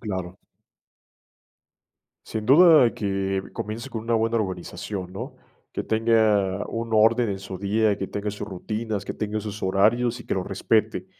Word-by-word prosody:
Claro. 95 -5 -5 1.9
Sin 110 -1 -5
duda 155 -3 +7
que 95 -1 -1
comience 115 +5 -5
con 110 -3 -5
una 115 +1 0
buena 115 +1 +1
organización, 95 -1 -4
¿no?, 95 - -7 0.4
que - - -3
tenga 110 -4 +2
un 115 0 -4
orden 115 +1 +4
en 95 - -3
su 95 -1 -8
día, 105 +1 +1
que 95 - -3
tenga 105 +2 -4
sus 105 0 -6
rutinas, 105 +1 -4
que - - -5
tenga 110 0 -3
sus 105 0 -6
horarios 115 +6 +2
y - - -13
que - - -1
lo 95 - -2
respete. - - 0
105 Hz, 155 wpm, -24 LUFS, 95-115 Hz, 1.9 s, duda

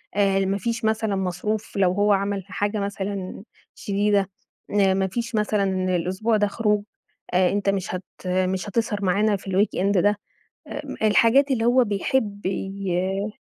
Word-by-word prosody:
آآ، 195 -1 +3
ما 195 +1 0
فيش 230 +2 -2
مثلًا 220 -1 +1
مصروف 195 +3 -3
لو 190 -2 +4
هو 205 +2 +3
عمل 200 -1 -1
حاجة 205 +2 -2
مثلًا، 200 -1 -4 0.3
شديدة، 200 -1 0 0.5
آآ، 195 -1 +4
ما 190 0 +1
فيش 230 +4 -4
مثلًا 195 -3 +1
الأسبوع 190 +6 0
ده 205 0 +2
خروج، 210 0 0 0.5
آآ، 180 0 +4
أنت 200 0 0
مش 190 -2 -1
هت 180 - -5 0.2
مش 185 +2 0
هتسهر 205 -1 -1
معانا 205 +3 +2
في 195 - -10
الweekend 195 0 +1
ده، 205 +2 +2 0.5
آآ، - - -5 0.2
الحاجات 230 +6 +4
اللي 230 -3 +1
هو 250 +2 +5
بيحب 205 0 -1
ي 195 +1 -2
200 Hz, 150 wpm, -24 LUFS, 190-215 Hz, 0.5 s, هو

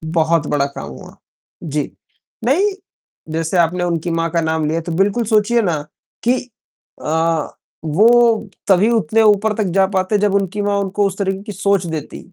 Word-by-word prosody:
बहुत 160 -1 +2
बड़ा 140 -1 +1
काम 140 - -7
हुआ। - - -12 0.5
जी, 150 -2 -3 0.5
नहीं, 375 +11 +3 0.6
जैसे 165 +2 -1
आपने 175 +1 +2
उनकी 170 -1 -1
माँ 165 0 0
का 170 - +1
नाम 160 -1 0
लिया 165 +2 -1
तो 170 +1 -6
बिल्कुल 200 +7 +1
सोचिए 225 +2 +2
ना 165 -7 -1 0.4
कि 250 +2 +3 0.7
अ, 160 0 0 0.4
वो 225 +6 +4 0.2
तभी 200 +3 +4
उतने 225 0 +2
ऊपर 215 0 +3
तक 215 - +1
जा 195 -1 +5
पाते 185 +3 +1
जब 205 -1 +1
उनकी 200 +1 -1
माँ 205 0 0
उनको 200 +1 0
उस 195 - -6
तरीके 195 -1 -2
की 210 - -7
सोच 200 -1 0
देती। 160 -2 -5
190 Hz, 170 wpm, -18 LUFS, 165-210 Hz, 0.7 s, जा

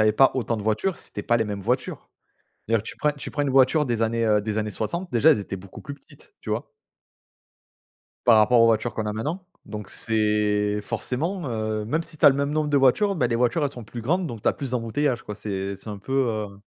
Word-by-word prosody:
avait 110 0 +4
pas 135 +4 +5
autant 120 -3 -1
de 105 - -5
voitures, 110 - 0
c'était 105 - -6
pas 120 - +2
les 110 - +1
mêmes 105 -2 -4
voitures. 125 +5 -2 0.6
D'ailleurs 115 -2 +1
tu - - -8
prends 150 -1 +2
tu 145 - -8
prends 145 - -1
une 140 - 0
voiture 135 +3 +4
des 120 -2 -1
années 115 +1 +1
heu, 105 -1 +3
des 110 0 -3
années 105 0 -1
60, 170 - -4
déjà 140 +7 +5
elles 130 - +2
étaient 100 -1 -5
beaucoup 95 0 -12
plus 140 -1 -7
petites, 140 - -20
tu - - -8
vois? - - -3 1.6
Par 115 -2 +7
rapport 115 +3 +5
aux 115 - +7
voitures 115 +1 +1
qu'on 110 -1 -3
a 105 - -1
maintenant, 150 - -4 0.2
donc 105 -2 -7
c'est 105 -1 +1
forcément 160 - -3
heu, 110 -2 -2
même 160 +9 -1
si 165 -2 -8
tu - - +5
as - - +12
le 135 - +3
même 140 +1 -1
nombre 150 0 0
de 145 - +2
voitures, 165 +10 +3
bah, 125 -8 +1
les 115 - 0
voitures 125 +6 +1
elles 140 - 0
sont 120 -5 -9
plus 120 +3 -8
grandes 175 +7 0
donc 115 -6 -7
tu - - +3
as - - +3
plus 135 -3 -5
d'embouteillages 120 +2 0
quoi 105 - -7
c'est 100 -2 -4
c'est 110 - -9
un 100 - -6
peu 130 +7 -7 0.2
heu 105 -3 -4
115 Hz, 250 wpm, -24 LUFS, 105-140 Hz, 1.6 s, as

